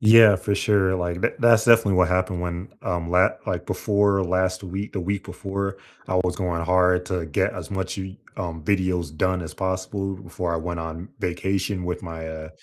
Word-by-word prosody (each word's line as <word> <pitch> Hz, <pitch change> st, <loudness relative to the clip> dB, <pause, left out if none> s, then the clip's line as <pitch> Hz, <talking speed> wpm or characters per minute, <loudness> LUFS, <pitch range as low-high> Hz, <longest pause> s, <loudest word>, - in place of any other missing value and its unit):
Yeah, 110 Hz, -2 st, +8 dB
for 100 Hz, +2 st, -1 dB
sure. 100 Hz, -3 st, +2 dB
Like, 90 Hz, 0 st, -2 dB
th -, -, +2 dB
that's 115 Hz, -2 st, +6 dB
definitely 115 Hz, -5 st, +5 dB
what 90 Hz, -1 st, +5 dB
happened 90 Hz, -1 st, 0 dB
when, 90 Hz, +1 st, -4 dB
um, 85 Hz, -2 st, -2 dB
la 90 Hz, +1 st, +5 dB, 0.2 s
like -, -, -2 dB
before 100 Hz, -1 st, +2 dB
last 95 Hz, +1 st, 0 dB
week, 95 Hz, +3 st, -5 dB
the 95 Hz, -, -2 dB
week 100 Hz, +2 st, -2 dB
before 100 Hz, +1 st, -4 dB, 0.3 s
I 95 Hz, -, 0 dB
was 90 Hz, -1 st, -1 dB
going 85 Hz, -3 st, -1 dB
hard 90 Hz, 0 st, +3 dB
to 90 Hz, -3 st, -2 dB
get 70 Hz, -, 0 dB
as -, -, -7 dB
much 95 Hz, 0 st, -3 dB
You 95 Hz, 0 st, -6 dB, 0.2 s
um, 85 Hz, -4 st, -4 dB
videos 90 Hz, -4 st, 0 dB
done 95 Hz, +1 st, +1 dB
as 80 Hz, -, -8 dB
possible 95 Hz, +1 st, -2 dB
before 90 Hz, -1 st, -4 dB
I -, -, +1 dB
went 85 Hz, +1 st, -4 dB
on 80 Hz, +3 st, -6 dB
vacation 95 Hz, +1 st, -1 dB
with 90 Hz, 0 st, -3 dB
my 80 Hz, -2 st, -6 dB
uh, 80 Hz, 0 st, -7 dB
95 Hz, 195 wpm, -24 LUFS, 85-100 Hz, 0.3 s, Yeah